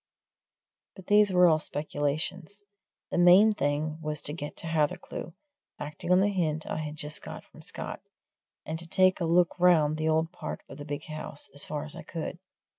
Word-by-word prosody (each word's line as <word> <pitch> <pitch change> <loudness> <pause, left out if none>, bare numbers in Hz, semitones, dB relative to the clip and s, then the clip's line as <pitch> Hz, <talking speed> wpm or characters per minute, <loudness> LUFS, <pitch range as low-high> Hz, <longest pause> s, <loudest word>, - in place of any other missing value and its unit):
But 190 - -12
these 205 -1 +5
were 180 -1 +6
all 160 -2 +5
speculations 155 +6 -3 0.5
the - - 0
main 185 +5 +7
thing 155 -2 -1
was 150 -1 -3
to 145 - 0
get 150 -2 -6
to - - -6
Hathercleugh, 160 0 -2 0.5
acting 150 +4 -5
on 180 +1 +6
the 205 +1 +2
hint 160 -4 0
I - - -3
had 155 -1 -4
just 150 0 -2
got - - -8
from - - -16
Scott, - - -5 0.6
and 160 +1 -4
to 170 - -6
take 185 +2 +3
a - - +1
look 175 +2 +3
round 160 -4 +4
the 155 0 0
old 160 +1 +1
part - - -6
of - - -11
the 145 - -7
big 145 -1 -4
house, 155 -2 -5
as 140 - -1
far 150 0 -4
as 150 - -7
I - - -7
could. 170 +1 -6
160 Hz, 190 wpm, -28 LUFS, 150-180 Hz, 0.6 s, main